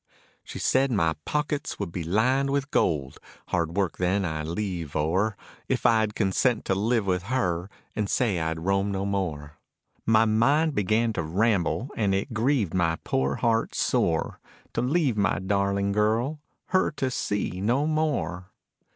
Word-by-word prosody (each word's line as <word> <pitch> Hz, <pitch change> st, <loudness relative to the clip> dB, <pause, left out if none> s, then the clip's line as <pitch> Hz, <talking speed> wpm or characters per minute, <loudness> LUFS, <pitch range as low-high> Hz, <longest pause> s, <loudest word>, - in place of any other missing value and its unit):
She -, -, -8 dB
said 135 Hz, +1 st, +2 dB
my 80 Hz, -8 st, +2 dB
pockets 150 Hz, -1 st, -2 dB
would 100 Hz, -5 st, -4 dB
be 85 Hz, -1 st, -4 dB
lined 125 Hz, +11 st, +2 dB
with 140 Hz, 0 st, -1 dB
gold, 70 Hz, -6 st, 0 dB, 0.3 s
hard 85 Hz, 0 st, -1 dB
work 95 Hz, -4 st, 0 dB
then 95 Hz, +2 st, +1 dB
I'd 80 Hz, -2 st, -3 dB
leave 85 Hz, -4 st, -4 dB
o'er 95 Hz, +8 st, +1 dB, 0.3 s
If -, -, -1 dB
I'd 110 Hz, -2 st, +3 dB
consent 110 Hz, +3 st, +1 dB
to -, -, +1 dB
live 110 Hz, +3 st, +1 dB
with 90 Hz, -2 st, 0 dB
her 95 Hz, -7 st, -1 dB, 0.3 s
and 105 Hz, -2 st, -1 dB
say 110 Hz, -8 st, +1 dB
I'd 80 Hz, 0 st, -2 dB
roam 95 Hz, +3 st, +1 dB
no 95 Hz, 0 st, -2 dB
more. 80 Hz, -7 st, -3 dB, 0.5 s
My 110 Hz, 0 st, +5 dB
mind 140 Hz, +9 st, +3 dB
began 110 Hz, +1 st, +1 dB
to -, -, -1 dB
ramble 100 Hz, -, 0 dB
and 100 Hz, -3 st, +1 dB
it 100 Hz, +6 st, -2 dB
grieved 115 Hz, -, +1 dB
my 85 Hz, -3 st, +2 dB
poor 65 Hz, +1 st, 0 dB
heart 115 Hz, -1 st, 0 dB
sore, 80 Hz, -1 st, 0 dB, 0.3 s
To -, -, 0 dB
leave 135 Hz, -2 st, +1 dB
my 100 Hz, -2 st, +2 dB
darling 100 Hz, +1 st, 0 dB
girl, 110 Hz, +8 st, +1 dB, 0.3 s
her 185 Hz, 0 st, +3 dB
to 130 Hz, -2 st, -2 dB
see 100 Hz, -6 st, -2 dB
no 125 Hz, +8 st, +2 dB
more. 135 Hz, -, -1 dB
100 Hz, 160 wpm, -26 LUFS, 90-120 Hz, 0.5 s, My